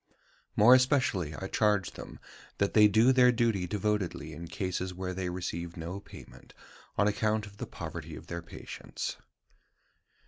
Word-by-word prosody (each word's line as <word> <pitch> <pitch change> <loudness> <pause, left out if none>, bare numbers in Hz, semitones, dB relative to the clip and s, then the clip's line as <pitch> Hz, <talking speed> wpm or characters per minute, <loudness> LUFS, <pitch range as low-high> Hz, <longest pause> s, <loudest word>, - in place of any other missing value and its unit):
More 115 +4 +8
especially 125 - +2
I 95 - -5
charge 105 -1 +1
them - - -10 0.4
that 100 - +1
they 105 -1 +8
do 110 +5 +5
their 125 -1 +6
duty 115 -6 +1
devotedly 95 -5 -2
in 85 +3 -8
cases 90 +1 -3
where 90 0 -4
they 90 -1 -3
receive 85 -1 -4
no 85 +4 -5
payment - - -14 0.4
on 105 - +4
account 105 +1 +1
of 100 -1 -14
the - - -5
poverty - - -7
of - - -10
their 85 0 -5
patients. 85 - -6
100 Hz, 150 wpm, -30 LUFS, 90-110 Hz, 0.4 s, More